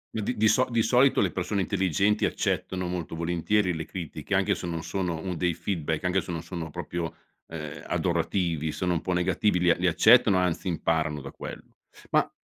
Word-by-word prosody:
Ma 110 - -1
di 125 +3 -2
di 110 - +4
so 130 +4 +4
di 115 -1 +2
solito 125 +4 +4
le 95 -4 +2
persone 95 +2 -1
intelligenti 100 +2 +1
accettano 90 -1 -1
molto 90 -3 -4
volentieri 85 +3 +1
le 80 - -4
critiche 85 -5 -4
anche - - +2
se - - -6
non 85 -1 -3
sono 85 0 -2
un 90 +1 -4
dei 90 0 0
feedback, 85 -3 -2
anche 90 +1 +2
se 90 - -7
non 80 - -3
sono 85 -2 -6
proprio, 85 +2 -4 0.3
ehm, 75 -3 -7
adorativi, 80 -5 0
sono 90 -2 -1
un 85 - -1
po' 95 - -3
negativi, 90 +2 +1
li 90 - +3
a - - +5
li 90 0 0
accettano 110 +3 +6
anzi 90 0 0
imparano 80 -3 0
da - - -8
quello. - - -9 0.4
Ma - - +3
90 Hz, 200 wpm, -27 LUFS, 80-95 Hz, 0.4 s, accettano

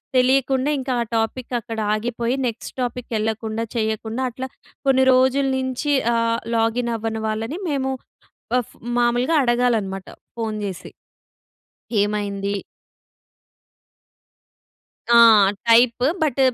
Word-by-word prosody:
తెలియకుండా 260 +1 +3
ఇంకా 260 0 -2
ఆ - - +1
టాపిక్ 225 +3 -2
అక్కడ 230 -1 -6
ఆగిపోయి 235 +3 -1
నెక్స్ట్ 230 0 -6
టాపిక్ 245 0 -4
యెళ్ళకుండా 220 +1 -2
చేయకుండా 220 +1 -2
అట్లా 260 +2 -6 0.4
కొన్ని 265 -1 +4
రోజుల 260 +2 +3
నుంచి 260 +3 -1 0.2
ఆహ్, 230 0 +1 0.2
లాగిన్ 230 +1 +1
అవ్వని 220 0 -3
వాళ్ళని 225 - -3
మేము 270 -2 -1 0.7
అఫ్ 235 - -11 0.2
మామూలుగా 245 +5 +2
అడగాలన్నమాట 230 -6 0 0.3
ఫోన్ 220 -2 -3
జేసి. 190 -3 -6 1.1
ఏమైంది? 205 -1 -2 2.6
ఆ! - - +7 0.5
Type 235 +1 +5 0.2
but 280 -3 +1
235 Hz, 100 wpm, -22 LUFS, 220-255 Hz, 2.6 s, ఆ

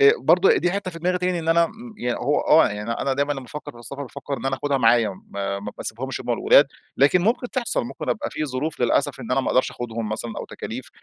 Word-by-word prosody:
آآ 425 0 +8
برضو 395 - +4
دي 175 - +1
حتّة 200 -1 -2
في 165 - -9
دماغي 180 +2 0
تاني 180 -1 0
إن 165 -1 -4
أنا، 170 +1 +5
امم، 225 +4 -9
يا 120 0 -1
هو 140 +4 +1
آه 160 - +5
يعني، 105 +2 -4
أنا 135 +3 -1
دايمًا 140 +2 0
لمّا 135 -2 -6
افكّر 150 +1 -8
في 120 - -15
السفر 135 +5 -7
بافكّر 140 +1 -5
إن 135 - -5
أنا 135 0 0
أخدها 140 +1 0
معايا، 115 -2 +4 0.2
ما 100 0 -3
ما 105 +1 -6
باسيبهمش 130 +4 -5
همَّ - - -9
والولاد، - - +5 0.3
لكن 145 +7 +5
ممكن 240 +4 0
تحصل، 255 -3 -1
ممكن 235 - -7
أبقى - - -1
في 155 - -3
ظروف 145 +3 -3
للأسف 135 +3 +1
إن 120 - -7
أنا 135 - +3
ما - - -2
أقدرش 130 - +2
أخدهم 115 -2 -4
مثلًا، 110 +2 -4
أو - - -5
تكاليف، - - -7
140 Hz, 250 wpm, -23 LUFS, 120-175 Hz, 0.3 s, آآ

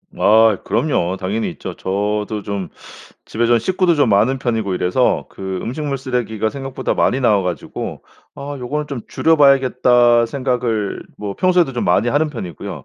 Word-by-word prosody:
아 110 -1 +4
그럼요. 95 - 0
당연히 105 +4 -2
있죠. - - -8
저도 105 +2 -2
좀 100 -4 -4 0.6
집에 120 +2 -1
좀 120 0 +4
식구도 180 - +1
좀 145 -5 +2
많은 110 +6 +3
편이고 110 -6 -1
이래서 90 - +1
그 95 -1 -5
음식물 140 +3 -3
쓰레기가 120 -4 -2
생각보다 135 +1 -4
많이 130 - +1
나와 105 -6 +3
가지고 90 -2 -5 0.3
'아 145 +1 -6
요거는 145 +4 -3
좀 140 -4 -5
줄여 160 0 +2
봐야겠다.' 125 -4 +4
생각을 120 -5 -2 0.2
뭐 100 -1 -5
평소에도 180 - +2
좀 120 - -1
많이 100 +6 +2
하는 150 +5 +1
편이고요. 95 - -7
120 Hz, 345 characters per minute, -18 LUFS, 105-135 Hz, 0.6 s, 아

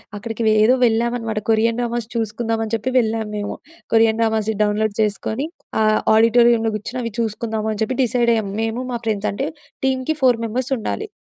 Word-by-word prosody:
అక్కడికి 225 +2 -5
వె - - +5
ఏదో 250 +4 +5
వెళ్ళామనమాట 230 -1 0
కొరియన్ 225 +1 +2
డ్రామాస్ 235 -1 -2
చూసుకుందామని 225 0 -2
చెప్పి 225 +4 -2
వెళ్ళాము 220 -1 -1
మేము. 205 0 -4 0.4
కొరియన్ 225 0 +4
డ్రామాస్ 220 -1 +1
డౌన్లోడ్ 210 0 +1
చేసుకొని 220 +6 -1 0.3
ఆ - - +4 0.3
ఆడిటోరియంలో 230 0 +4
కూర్చొని 245 +4 -4
అవి 230 - -3
చూసుకుందాము 220 -1 -2
అని 215 +1 -5
చెప్పి 255 +4 -2
డిసైడ్ 240 -1 +2
అయ్యాము 200 -3 -2
మేము 225 +2 -2
మా 240 - -2
ఫ్రెండ్స్ 210 -2 0
అంటే 270 +8 -3 0.4
టీంకి 265 +4 0
4 250 -3 +4
మెంబర్స్ 255 +4 -3
ఉండాలి. 430 - -4
225 Hz, 165 wpm, -20 LUFS, 220-240 Hz, 0.4 s, వె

